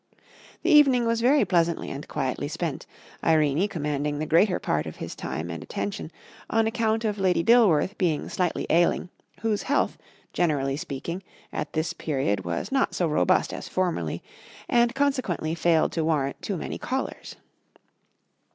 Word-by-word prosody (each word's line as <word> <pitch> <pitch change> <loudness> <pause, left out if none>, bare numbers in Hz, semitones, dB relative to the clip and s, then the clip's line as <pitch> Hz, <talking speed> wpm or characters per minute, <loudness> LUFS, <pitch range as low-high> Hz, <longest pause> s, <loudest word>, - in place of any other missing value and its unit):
The - - +2
evening 270 -5 +6
was 230 0 +1
very 275 +5 +4
pleasantly 170 -2 +1
and 140 +2 -7
quietly 135 +1 -2
spent, 165 -1 -4 0.4
Irene 155 +3 +3
commanding 150 -5 -2
the 155 - -2
greater 180 +5 +3
part 75 +1 -1
of 80 - -7
his - - -6
time 85 +2 -5
and 85 - -6
attention, 200 -4 -4 0.4
on 225 0 +2
account 225 0 0
of 210 -1 -1
Lady 185 -3 +2
Dilworth 210 -5 +4
being 170 -6 0
slightly 180 -2 -1
ailing, 170 +2 +2 0.3
whose 215 -2 0
health, 285 +2 0 0.3
generally 140 -5 +1
speaking, 150 +5 -5 0.3
at 150 - -4
this 160 +2 -1
period 135 - -1
was 85 - -3
not 270 0 +1
so 175 - +1
robust 150 - +2
as - - -6
formerly, 185 -2 -1 0.4
and 240 0 +3
consequently 255 - 0
failed 170 -1 +2
to 165 - -1
warrant 150 -4 0
too 195 - -3
many - - -5
callers. 265 +1 -4
170 Hz, 150 wpm, -26 LUFS, 150-220 Hz, 0.4 s, evening